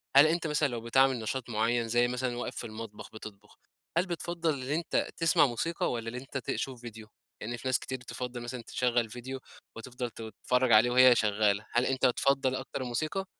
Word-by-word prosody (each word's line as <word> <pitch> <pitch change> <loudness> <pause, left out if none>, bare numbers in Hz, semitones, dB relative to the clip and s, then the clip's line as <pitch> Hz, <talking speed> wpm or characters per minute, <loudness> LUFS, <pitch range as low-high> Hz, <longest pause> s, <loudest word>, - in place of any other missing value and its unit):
هل 145 +3 +9
أنت 170 0 0
مثلًا 150 -1 +2
لو 120 -3 -4
بتعمل 130 +1 +3
نشاط 120 +2 -4
معيّن 115 +1 +1
زي 120 +1 +3
مثلًا 125 0 -2
واقف 120 - -4
في - - -4
المطبخ 110 -1 -8
بتطبخ، 105 -1 -11 0.4
هل 180 - +3
بِتفَضَّل 170 -1 -2
اللي 135 +2 -3
أنت 170 +1 0
تسمع 165 -3 +4
موسيقى، 150 +7 -1
والّا 115 -1 -4
اللي 120 +2 -4
أنت 135 +1 -6
تشوف 130 -1 -3
فيديو؟ 110 -2 -9 0.3
لإن 120 +2 -4
في 130 - -6
ناس 130 - +2
كتير 130 - -5
تِفَضّل 125 0 -6
مثلًا 120 0 -5
تشغل 120 -1 0
فيديو، 130 +3 -6 0.4
وتفضل 125 +1 -5
تتفرّج 120 +3 -1
عليه 110 +3 +7
وهي 125 -1 +7
شغالة، 105 -1 +2
هل 120 +2 +2
أنت 130 0 +1
تفضّل 130 +1 +2
أكتر 130 0 -5
الموسيقى؟ 155 +10 -2
125 Hz, 190 wpm, -30 LUFS, 115-135 Hz, 0.4 s, هل